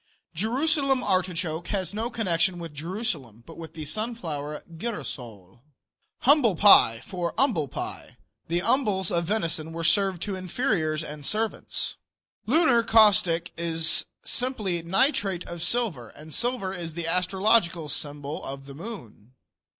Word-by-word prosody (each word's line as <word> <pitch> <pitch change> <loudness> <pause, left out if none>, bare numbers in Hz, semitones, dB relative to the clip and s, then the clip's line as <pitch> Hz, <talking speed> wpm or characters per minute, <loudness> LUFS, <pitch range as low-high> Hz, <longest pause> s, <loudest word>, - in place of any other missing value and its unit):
Jerusalem 270 - +1
artichoke 175 -4 -1
has 190 -3 -2
no 225 +3 -2
connection 185 -6 0
with 165 -3 -7
Jerusalem, 150 - -4
but 165 - -12
with 165 -1 -10
the 155 -2 -6
sunflower, 160 -7 -4
"girasole." 120 - -7 0.6
Humble 260 - +5
pie, 135 - +6
for 175 -2 -3
"umbil 190 - +1
pie." - - -7 0.3
The 170 +2 0
umbils 210 -6 +1
of 170 -1 +1
venison 165 -5 -2
were 165 0 -4
served 190 0 +2
to 200 -2 -3
inferiors 180 -5 -1
and 150 -1 -8
servants. 215 +8 -1 0.5
Lunar 300 -2 +4
caustic 205 -7 +4
is 165 -1 +2 0.2
simply 215 -9 -1
nitrate 195 - +1
of 175 -1 -6
silver, 175 - 0
and 155 0 -11
silver 240 -6 0
is 170 -4 -5
the 170 -1 -3
astrological 180 -1 +2
symbol 145 +1 -4
of 135 0 -7
the 140 - -10
moon. 135 - -10
175 Hz, 130 wpm, -26 LUFS, 160-220 Hz, 0.6 s, pie